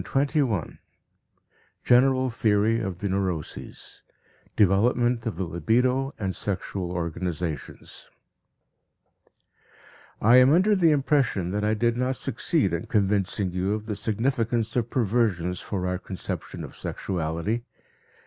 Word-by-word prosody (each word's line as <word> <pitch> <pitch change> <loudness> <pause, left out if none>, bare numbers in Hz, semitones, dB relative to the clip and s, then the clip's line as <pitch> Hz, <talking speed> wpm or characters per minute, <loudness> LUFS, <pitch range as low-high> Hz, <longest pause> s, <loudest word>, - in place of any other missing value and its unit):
TWENTY 140 +3 0
FIRST 135 - +1
LECTURE 90 -7 -4 1.0
GENERAL 130 +1 +4
THEORY 110 0 +2
OF 95 -6 -4
THE 100 - -1
NEUROSES 95 -5 -4 0.5
Development 115 +4 +2
of 110 - -3
the 95 - -3
Libido 125 - 0
and 95 -3 -3
Sexual 95 -2 -3
Organizations 85 -3 -5 2.1
I 120 +4 +6
am 130 +2 +6
under 190 +6 +4
the 175 -4 +4
impression 135 - +1
that 105 +1 -2
I 105 +1 +2
did 120 +2 +1
not 125 +1 0
succeed 135 - 0
in 85 - -3
convincing 100 -2 0
you 95 +3 -1
of 110 0 -6
the 110 -2 -3
significance 115 +1 -1
of 120 -3 0
perversions 100 -7 0
for 95 -3 -3
our 90 0 -1
conception 95 -1 -6
of - - -9
sexuality. 90 +6 -3
105 Hz, 125 wpm, -25 LUFS, 95-125 Hz, 2.1 s, I